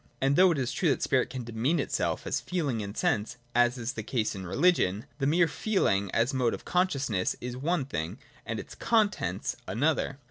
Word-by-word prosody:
And 135 +1 +2
though 185 +3 +7
it 165 - 0
is 130 -2 -1
true 165 +6 +1
that 135 - +1
spirit 130 -2 +2
can 130 -1 -5
de 115 - -8
mean 130 +9 +1
itself - - -1
as - - -1
feeling 145 -11 -1
and 100 0 -6
sense 110 +4 0
— 120 - -35
as 120 +1 +4
is 120 +1 -3
the 110 - -4
case 110 0 -1
in 95 -2 -6
religion, 115 - +2
the 135 - +1
mere 170 +3 +4
feeling, 115 - +1
as 115 +8 +1
a - - -1
mode 120 -3 +2
of - - -13
consciousness, 140 - 0
is 125 0 -5
one 150 +3 0
thing, 80 - -4 0.3
and - - -4
its - - -8
contents 205 - 0
another. 135 +7 0
130 Hz, 215 wpm, -29 LUFS, 110-155 Hz, 0.3 s, though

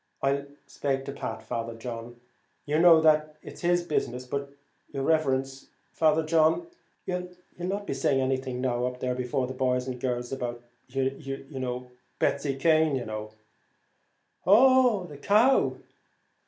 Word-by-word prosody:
"I'll 140 +1 +1 0.2
spake 135 -1 -2
to - - -4
Pat, 125 -5 -5
Father 115 0 -4
John; 115 0 -7 0.5
you 150 +2 +1
know 165 -2 +7
that's 155 -1 +1
his 175 0 +2
business; 125 -6 -2
but 140 +2 -4 0.4
your 135 - -3
riverence, 135 -3 0 0.3
Father 160 0 +3
John, 160 - +3 0.4
you'll 180 0 -3 0.3
not 195 +3 -3
be - - -2
saying 135 0 +1
anything 130 -1 -1
up 125 0 -1
there 125 0 -1
before 125 +1 -1
the 130 - -5
boys 125 -1 0
and 125 -1 -5
girls 125 -1 -2
about 120 -2 -4 0.2
you 135 +1 -3
know 125 -2 -4 0.3
Betsy 140 -1 0
Cane, 155 0 +3
you 125 - -3
know." 110 0 -6 1.1
"Oh! 245 +1 +5
the 150 -5 -10
cow! 215 - +3
135 Hz, 140 wpm, -27 LUFS, 125-160 Hz, 1.1 s, know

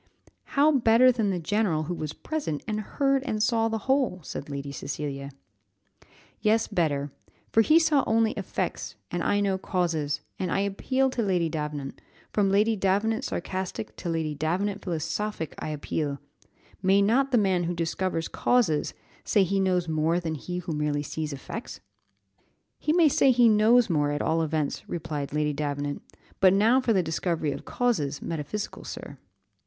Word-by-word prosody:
"How 295 +2 +6
better 255 -2 +5
than 225 -4 0
the 190 - 0
general, 175 -2 0
who 170 +3 -3
was 155 -3 -4
present, 280 - -4
and 215 -1 -1
heard 275 +4 +1
and 220 -6 -2
saw 225 0 +2
the 225 0 -1
whole?" 265 -8 +1
said 145 +1 -6
Lady 140 0 -5
Cecilia. 140 0 -5 1.1
"Yes, 220 +1 +2
better, 145 -4 0 0.4
for 225 - +5
he 305 +8 +5
saw 315 -4 +3
only 225 0 +3
effects, - - -4 0.2
and - - -2
I 205 - +2
know 195 -2 0
causes; 160 -6 -1 0.2
and 185 -3 -2
I 195 - +1
appeal 260 +7 0
to 245 - -1
Lady 180 -6 +1
Davenant, 150 -3 -5 0.3
from 200 -2 +2
Lady 210 +3 +3
Davenant 210 +6 +1
sarcastic 175 - -4
to 175 - -4
Lady 160 -2 -1
Davenant 185 +7 -1
philosophic 170 +1 -3
I - - -4
appeal 150 -1 -2 0.6
may 190 +1 +4
not 260 +7 +3
the 250 - +3
man 190 -4 +2
who 175 +1 -2
discovers 165 0 -1
causes, 215 -12 +1 0.3
say 205 - +3
he 195 +1 0
knows 180 -2 +1
more 160 +2 +1
than 165 -2 -3
he 175 +4 -5
who 175 -2 -4
merely 150 -1 -1
sees 155 +1 -4
effects?" 145 - -7 1.0
"He 300 - 0
may 335 -1 +5
say 275 -1 +4
he 245 -2 +5
knows 225 +2 +5
more, 150 -5 +1
at 145 0 -1
all 165 +1 +1
events," 155 -2 -2
replied 150 -4 -4
Lady 150 0 0
Davenant; 145 0 -3 0.4
"but 190 -1 +6
now 225 +6 +4
for 245 - +1
the 190 -4 +3
discovery 160 -1 -1
of 140 - -7
causes, 155 - 0
metaphysical 165 +6 -5
sir." - - -8
185 Hz, 165 wpm, -27 LUFS, 155-220 Hz, 1.1 s, How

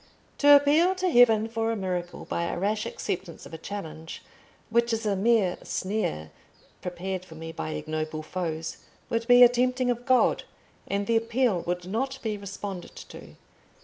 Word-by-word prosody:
"To 290 0 +8
appeal 305 +6 +4
to 370 -1 0
heaven 225 -4 +5
for 225 0 -1
a - - -1
miracle 180 -3 -4
by 170 - -2
a - - -3
rash 210 +4 -1
acceptance 175 -2 -5
of - - -12
a - - -5
challenge, 160 -4 -7 0.5
which 235 +1 +2
is 225 0 -2
a 205 -2 +1
mere 200 -2 +2
snare 130 - -3 0.5
prepared 185 +1 -4
for 165 -3 -13
me 165 +1 -7
by 80 - -5
ignoble 155 - -4
foes, 160 -1 -4 0.3
would 230 0 -1
be 245 0 +8
a - - +11
tempting 250 +1 +1
of 245 +1 -5
God, 255 -1 +3 0.4
and 200 0 -1
the 230 +2 +2
appeal 230 -4 +1
would 180 0 -2
not 260 +7 -2
be 220 -2 -1
responded 200 -2 -7
to. - - -11
205 Hz, 170 wpm, -27 LUFS, 175-235 Hz, 0.5 s, a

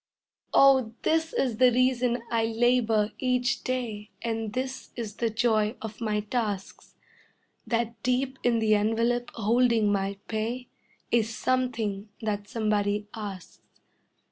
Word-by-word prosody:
Oh, 265 -5 +5
this 320 0 +1
is 245 -5 0
the 255 0 +6
reason 250 -1 +2
I 230 -1 +2
labor 225 -2 +2
each 250 0 0
day 230 -5 -3
And 225 -2 -2
this 260 +1 -4
is 225 -3 -5
the 230 - +1
joy 220 -1 +1
of 220 +1 -8
my 210 -2 0
tasks: 210 -3 -4 0.7
That 230 -1 -1
deep 260 +1 0
in 240 -1 +2
the 220 -1 +3
envelope 230 +3 +1
holding 230 -1 +3
my 195 0 -1
pay 230 +3 -3 0.4
Is 225 -1 +1
something 225 -6 -1
that 205 -2 -3
somebody 210 -2 0
asks. 200 -5 -8
230 Hz, 125 wpm, -27 LUFS, 215-250 Hz, 0.7 s, the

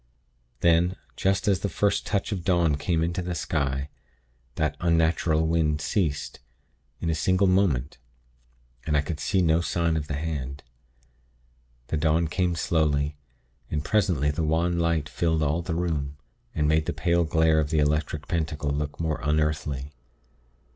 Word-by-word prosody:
"Then, 85 +2 +3 0.2
just 95 +1 0
as 100 -2 +3
the 100 - -2
first 100 +2 0
touch 105 +1 -1
of 95 -4 -3
dawn 85 -5 +2
came 80 +3 0
into 85 +2 -1
the 90 0 -3
sky, 70 -3 -1 0.7
that 75 -1 0
unnatural 80 -1 +2
wind 80 -2 +1
ceased, 80 -4 -1 0.6
in 85 - -1
a - - +1
single 95 +5 +2
moment; 85 -10 +1 0.9
and 75 -2 +2
I - - +3
could 75 +1 -5
see 90 +4 +1
no 80 0 +3
sign 85 -1 0
of 75 -2 -2
the 75 - -3
hand. 70 -3 -4 1.3
The 80 - 0
dawn 80 +2 +2
came 90 +2 0
slowly, 75 -3 +1 0.5
and 75 0 -2
presently 90 -9 +2
the 75 - -3
wan 85 +2 +1
light 85 -3 +1
filled 80 0 0
all 75 +3 +1
the 85 -1 -3
room, 75 -5 -2 0.4
and 75 -1 +1
made 80 0 +2
the - - -1
pale 85 0 +2
glare 80 0 +3
of 75 -2 0
the 80 - 0
Electric 75 0 0
Pentacle 75 -4 -1
look 75 0 -3
more 80 -2 -1
unearthly. 75 -2 -1
80 Hz, 155 wpm, -26 LUFS, 75-85 Hz, 1.3 s, Then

